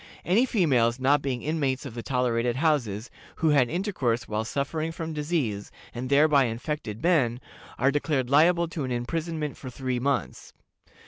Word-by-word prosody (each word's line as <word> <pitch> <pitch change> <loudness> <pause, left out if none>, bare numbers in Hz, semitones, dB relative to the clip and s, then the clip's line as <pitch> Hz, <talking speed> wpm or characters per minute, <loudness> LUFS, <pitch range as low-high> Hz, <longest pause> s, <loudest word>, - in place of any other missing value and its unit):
Any 220 +9 +3
females, 130 - +2
not 140 +2 +3
being 130 -4 -3
inmates 145 -3 -1
of 130 - -7
the 120 - -5
tolerated 120 -2 0
houses, 130 -8 0 0.2
who 160 - +1
had 140 -5 +4
intercourse 155 - -1
while 110 +1 -1
suffering 150 +7 -2
from 165 -1 -5
disease, 145 -10 -2 0.2
and 125 +1 -5
thereby 140 -1 +5
infected 115 -1 -4
men, 135 -9 +2 0.4
are 135 +2 +3
declared 145 -3 0
liable 170 +5 +4
to 165 -3 -4
an 130 - -3
imprisonment 155 +4 -3
for 130 - -8
three 130 0 -3
months. 140 +2 -2
140 Hz, 155 wpm, -26 LUFS, 120-155 Hz, 0.4 s, thereby